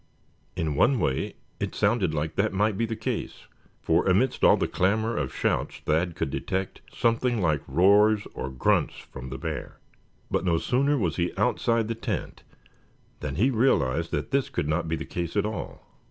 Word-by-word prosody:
In 80 Hz, -4 st, -1 dB
one 130 Hz, -, +3 dB
way 65 Hz, -, -1 dB, 0.2 s
it -, -, -3 dB
sounded 100 Hz, -9 st, +2 dB
like 80 Hz, 0 st, -2 dB
that 100 Hz, +2 st, 0 dB
might 105 Hz, +2 st, +1 dB
be 115 Hz, +3 st, 0 dB
the 115 Hz, -, -3 dB
case, 110 Hz, -, -4 dB, 0.4 s
for 80 Hz, +3 st, +2 dB
amidst 120 Hz, +8 st, +2 dB
all -, -, +7 dB
the -, -, 0 dB
clamor 110 Hz, +5 st, +1 dB
of 70 Hz, -3 st, -2 dB
shouts -, -, -1 dB
Thad 80 Hz, +2 st, +1 dB
could 70 Hz, -, -2 dB
detect 95 Hz, +6 st, -3 dB
something 115 Hz, 0 st, +1 dB
like 80 Hz, -6 st, +1 dB
roars 100 Hz, +7 st, +4 dB
or 65 Hz, -, -4 dB
grunts 65 Hz, -1 st, +1 dB
from 65 Hz, -1 st, -9 dB
the 65 Hz, -, -5 dB
bear. -, -, -5 dB, 0.5 s
But -, -, +1 dB
no 85 Hz, -3 st, +2 dB
sooner 140 Hz, -, +1 dB
was 90 Hz, -, -1 dB
he 85 Hz, 0 st, 0 dB
outside 115 Hz, -1 st, +1 dB
the 115 Hz, -, -1 dB
tent 115 Hz, -, -4 dB, 0.8 s
than 75 Hz, -3 st, -4 dB
he 120 Hz, -, +3 dB
realized 85 Hz, -, +2 dB
that 75 Hz, 0 st, -3 dB
this 140 Hz, -1 st, +1 dB
could 75 Hz, -, -2 dB
not 80 Hz, +2 st, 0 dB
be 80 Hz, -, 0 dB
the -, -, -5 dB
case 85 Hz, 0 st, -4 dB
at 105 Hz, -, +2 dB
all. 110 Hz, 0 st, -5 dB
95 Hz, 185 wpm, -26 LUFS, 80-110 Hz, 0.8 s, all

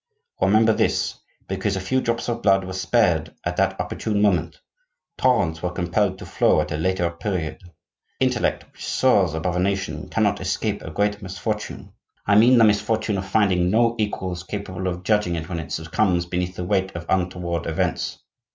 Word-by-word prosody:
Remember 110 Hz, +2 st, +4 dB
this: -, -, 0 dB, 0.3 s
because 95 Hz, +1 st, -1 dB
a -, -, -1 dB
few 130 Hz, +8 st, 0 dB
drops 115 Hz, -1 st, -1 dB
of 120 Hz, -1 st, -2 dB
blood 95 Hz, -1 st, +4 dB
were 95 Hz, -, -6 dB
spared 95 Hz, -4 st, +1 dB
at 90 Hz, 0 st, -3 dB
that 95 Hz, 0 st, +1 dB
opportune 100 Hz, +4 st, -2 dB
moment, 100 Hz, -4 st, +1 dB, 0.6 s
torrents 85 Hz, -11 st, +2 dB
were 90 Hz, -, -1 dB
compelled 90 Hz, +2 st, 0 dB
to -, -, -9 dB
flow -, -, +2 dB
at 75 Hz, 0 st, -2 dB
a -, -, -1 dB
later 90 Hz, +2 st, +1 dB
period. 85 Hz, -2 st, -3 dB, 0.6 s
The -, -, +3 dB
intellect -, -, 0 dB
which -, -, -12 dB
soars 100 Hz, -11 st, +2 dB
above 85 Hz, +2 st, -1 dB
a -, -, +1 dB
nation 95 Hz, -5 st, -2 dB
cannot 100 Hz, -3 st, +1 dB
escape 100 Hz, +3 st, -1 dB
a -, -, -7 dB
great 105 Hz, +5 st, -1 dB
misfortune; 95 Hz, -1 st, -5 dB, 0.3 s
I 100 Hz, -, +3 dB
mean 120 Hz, +5 st, +6 dB
the 115 Hz, -, +6 dB
misfortune 110 Hz, -1 st, +2 dB
of 95 Hz, -, -6 dB
finding 95 Hz, -4 st, +2 dB
no 115 Hz, +3 st, +3 dB
equals 95 Hz, -4 st, -2 dB
capable 95 Hz, -1 st, -5 dB
of 90 Hz, 0 st, -3 dB
judging 105 Hz, -3 st, +1 dB
it 80 Hz, -1 st, -4 dB
when 85 Hz, -2 st, -4 dB
it 80 Hz, -, -7 dB
succumbs 85 Hz, +2 st, 0 dB
beneath 90 Hz, +1 st, -3 dB
the 90 Hz, -, -4 dB
weight 95 Hz, -1 st, 0 dB
of 85 Hz, 0 st, -5 dB
untoward 90 Hz, -2 st, -1 dB
events. 80 Hz, -, -1 dB
95 Hz, 180 wpm, -23 LUFS, 90-105 Hz, 0.6 s, mean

